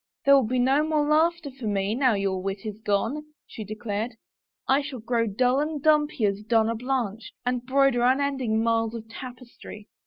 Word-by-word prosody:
" - - -55
There 280 - +7
will 270 -5 +5
be 255 +3 -1
no 265 +4 +3
more 305 -1 +1
laughter 320 0 +2
for 255 -4 -7
me 200 0 0
now 255 -2 +2
your 195 -2 -1
wit 195 +1 -4
is 215 -1 -6
gone," 220 +8 -1 0.2
she 220 - -8
declared. 215 +2 -4 0.3
" - - -56
I 270 +2 +3
shall 280 -2 -6
grow 230 +1 0
dull 250 +6 +1
and 300 0 -2
dumpy 300 -5 +2
as 200 0 -1
Donna 225 +1 +2
Blanche,* 230 -3 -3
and 250 -1 -1
broider 270 -1 +2
unending 260 -3 +1
miles 225 0 0
of 225 -1 -8
tapes 245 +1 -10
try. 210 -1 -10
245 Hz, 195 wpm, -25 LUFS, 215-275 Hz, 0.3 s, There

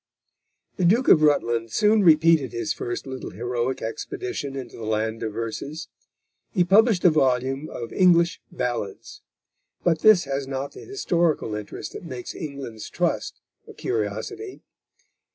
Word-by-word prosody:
The 185 - -1
Duke 225 +9 +4
of 155 - +7
Rutland 120 -6 +2
soon 210 - +3
repeated 160 - +5
his 135 +7 -2
first 120 0 -4
little 130 -1 -6
heroic 120 +2 -3
expedition 250 - -4
into 130 -3 -7
the 115 - -8
land 110 +1 -1
of 110 - -2
verses. 140 +8 -5 0.6
He 180 - +2
published 200 +1 +4
a 175 - +8
volume 135 0 +1
of 115 - -7
English 170 -2 +4
Ballads; 120 -6 -4 0.6
but 165 -3 +2
this 215 -5 +6
has 135 0 -3
not 135 +1 -4
the - - -12
historical 170 - 0
interest 105 -1 -6
which - - -7
makes 130 -8 -7
England's 140 -8 -7
Trust - - -2 0.3
a - - -12
curiosity. 110 - -4
140 Hz, 140 wpm, -24 LUFS, 120-175 Hz, 0.6 s, a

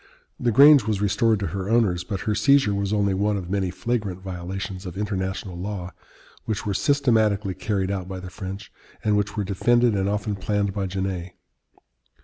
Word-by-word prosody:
The 120 - +1
Grange 140 0 +7
was 105 -3 0
restored 110 +2 +2
to 100 - -1
her 95 0 -3
owners, 105 -7 +2
but 95 0 -4
her 110 - 0
seizure 105 +1 +4
was 100 0 -1
only 100 -2 +2
one 100 +2 +1
of 90 -2 -6
many 100 -2 0
flagrant 105 -2 -2
violations 95 +1 -6
of 90 - -7
international 95 -2 -3
law 90 0 -5 0.5
which 110 -1 -3
were 100 - -1
systematically 110 -7 +2
carried 100 -1 -2
out 95 -2 -3
by 95 -1 -6
the 90 0 -9
French, 95 +1 -7 0.3
and 105 -1 +2
which 105 +1 -1
were 105 - +1
defended 120 +5 +2
and 100 0 0
often 105 0 -1
planned 100 0 -1
by 100 -1 -2
Genet. 95 -2 -4
100 Hz, 180 wpm, -24 LUFS, 95-105 Hz, 0.5 s, Grange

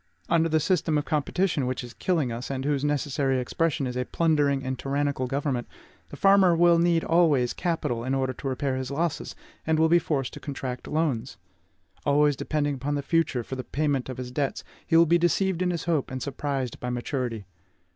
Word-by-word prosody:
Under 165 -1 +3
the 160 0 +3
system 160 -1 +1
of 145 - -1
competition 155 -1 0
which 130 0 -3
is 120 -1 -9
killing 160 -9 0
us, 120 +2 -5
and 135 -1 -3
whose 145 -1 0
necessary 140 -2 0
expression 140 +3 -1
is 125 -1 -4
a 125 - 0
plundering 145 -4 +1
and 130 -1 -3
tyrannical 140 -1 -1
government, 135 -2 -2 0.4
the - - -9
farmer 195 -3 +5
will 170 0 +5
need 170 -1 +3
always 155 -8 +3
capital 165 -9 -2
in 130 +2 -1
order 130 -1 0
to 135 - -6
repair 130 0 -1
his 130 -1 -4
losses, 160 +3 -2 0.3
and 160 -1 +3
will 160 +1 +4
be 175 +1 +6
forced 140 -6 -2
to - - -8
contract 130 -3 -5
loans. 135 -6 -1 0.7
Always 145 0 +3
depending 145 +1 -1
upon 140 +2 -2
the 140 - -2
future 160 -6 +1
for 130 - -6
the 130 - -5
payment 140 -2 -1
of 130 - -5
his 125 -1 -6
debts, 140 +1 -2 0.2
he 165 - +4
will 165 - +7
be 170 +2 +3
deceived 175 +2 +1
in 180 - +2
his 170 -2 -2
hope, 160 -5 0
and 130 - -4
surprised 135 -2 -3
by 125 - -4
maturity. 120 -3 -3
145 Hz, 200 wpm, -26 LUFS, 130-165 Hz, 0.7 s, will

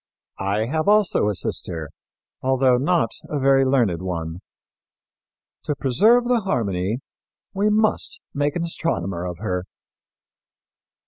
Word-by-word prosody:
I 100 +3 0
have 155 - -1
also 210 - +3
a 105 - -1
sister, 80 -4 -4 0.5
although 130 -1 +3
not 145 -3 +1 0.2
a 150 - -2
very 135 0 +4
learned 120 -11 +2
one. 85 -2 -4 1.3
To 150 - -1
preserve 210 - +4
the 245 -1 +3
harmony, 110 - -1 0.5
we 205 +2 +1
must 220 - +1
make 145 0 0
an 175 - -1
astronomer 95 - -2
of 90 -1 -6
her." 90 -2 -3
130 Hz, 120 wpm, -22 LUFS, -, 1.3 s, very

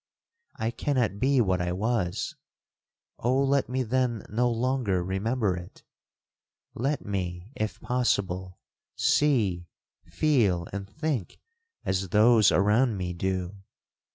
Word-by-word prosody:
I 110 +1 -2
cannot 125 -7 -1
be 135 0 +3
what 95 -4 +1
I 90 0 -1
was—Oh, 115 +5 -3
let 140 -1 +1
me 130 +1 0
then 125 -2 0
no 120 +4 +1
longer 120 -6 0
remember 100 +2 0
it! 85 -1 -10 0.9
Let 140 +5 -2
me, 90 0 -4
if 110 0 -3
possible, 95 -7 -1 0.4
see, 105 -13 +2 0.4
feel, 105 - +1
and 100 0 -5
think 150 - -3 0.5
as 95 0 -1
those 110 +1 +5
around 105 +4 +3
me 90 -1 -3
do! 95 +1 -2
105 Hz, 110 wpm, -27 LUFS, 95-125 Hz, 0.9 s, those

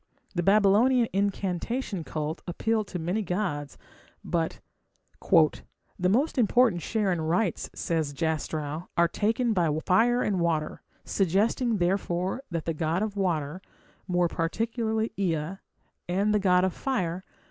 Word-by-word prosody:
The 175 - 0
Babylonian 215 +6 +4
incantation 195 +1 -1
cult 155 +1 -4
appealed 215 +4 -1
to 180 - -5
many 180 +6 -1
gods, 180 -7 -3 0.5
but 165 -2 -1 0.6
"the 180 -2 +1
most 265 +7 +1
important 230 -5 +3
share 210 -1 0
in 175 - 0
the - - -2
rites", 175 +3 0
says 160 -4 -1
Jastrow, 155 +1 -3
"are 170 0 +5
taken 225 +6 0
by 175 -5 +2 0.2
fire 235 +6 +3
and 195 -3 0
water 165 -3 -1 0.2
suggesting, 210 +5 +1
therefore, 180 +3 0
that 165 -3 -3
the 165 - -1
god 160 +5 0
of 215 -2 -3
water 170 -4 -1 0.5
more 175 -1 +2
particularly 220 +6 -1
Ea 170 -1 -1 0.5
and 200 +4 +1
the 210 - +3
god 180 -2 +3
of 190 - -1
fire 185 -9 -2
185 Hz, 135 wpm, -27 LUFS, 165-215 Hz, 0.6 s, are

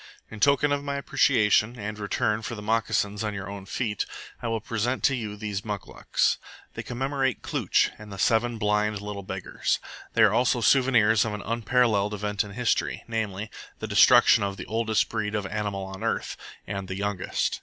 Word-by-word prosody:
In 110 - -8
token 140 +4 +4
of 145 0 0
my 140 0 -3
appreciation, 125 -6 +3
and 105 -1 -5
in 105 - -10
return 105 +1 0
for 120 - -5
the 105 - -7
moccasins 105 -1 0
on 105 -1 -2
your 100 0 -5
own 100 -1 -8
feet, 105 -2 -2 0.3
I - - -3
will 115 0 -1
present 115 +3 -2
to 135 - +4
you 105 -4 -5
these 105 -1 -4
muclucs. 105 -3 -1 0.3
They - - -5
commemorate 135 +1 -2
Klooch - - +1
and 105 -1 -11
the 100 - -7
seven 115 +3 +2
blind 105 0 +1
little 105 0 -6
beggars. 95 -1 -2 0.4
They 115 - +5
are 105 -1 +5
also 120 +1 +2
souvenirs 115 -3 +4
of 110 -2 -3
an 105 - -7
unparalleled 115 -2 +1
event 105 0 -1
in 100 -1 -10
history, 120 +2 0
namely, 110 -2 -3 0.3
the - - -5
destruction - - +6
of 100 -1 -2
the - - -6
oldest 110 -1 +1
breed 105 +1 -2
of 105 -2 -1
animal 100 -1 -3
on 95 0 -8
earth, - - -1 0.3
and 100 -1 -5
the 95 - -4
youngest. 100 -1 -1
105 Hz, 185 wpm, -26 LUFS, 100-115 Hz, 0.4 s, destruction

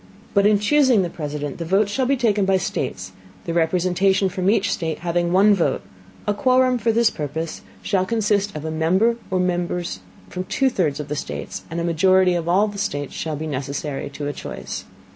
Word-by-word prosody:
But 200 0 +4
in 210 -1 +4
chusing 250 -1 +4
the 175 - -3
President, 145 -2 -5
the - - -2
Votes 195 +5 +2
shall 260 +3 0
be 275 +1 +2
taken 215 -5 +2
by 190 0 +3
States, 95 - -3 0.3
the 170 - -2
Representation 185 +3 +2
from 185 0 0
each 205 -2 +2
State 160 -3 -3
having 175 0 0
one 200 +3 +5
Vote; 165 -8 0 0.4
a 205 - +1
Quorum 255 +2 +3
for 230 +1 +2
this 230 0 +3
Purpose 160 +2 -4 0.2
shall 190 -2 +1
consist 205 -3 0
of 150 0 -5
a 160 - -2
Member 185 +9 +2
or 185 - 0
Members 175 -1 -1 0.3
from 185 0 -5
two 260 +7 +1
thirds 155 -10 0
of 150 - -5
the 150 - -3
States, - - -6
and 165 +1 -3
a - - -1
Majority 185 +2 +4
of 170 -1 -2
all 195 +5 +4
the 205 -1 -6
States 145 -8 -3
shall 155 -2 -3
be 155 +2 -5
necessary 140 0 -4
to 145 +1 -6
a 145 - -2
Choice. - - -7
185 Hz, 200 wpm, -22 LUFS, 160-205 Hz, 0.4 s, one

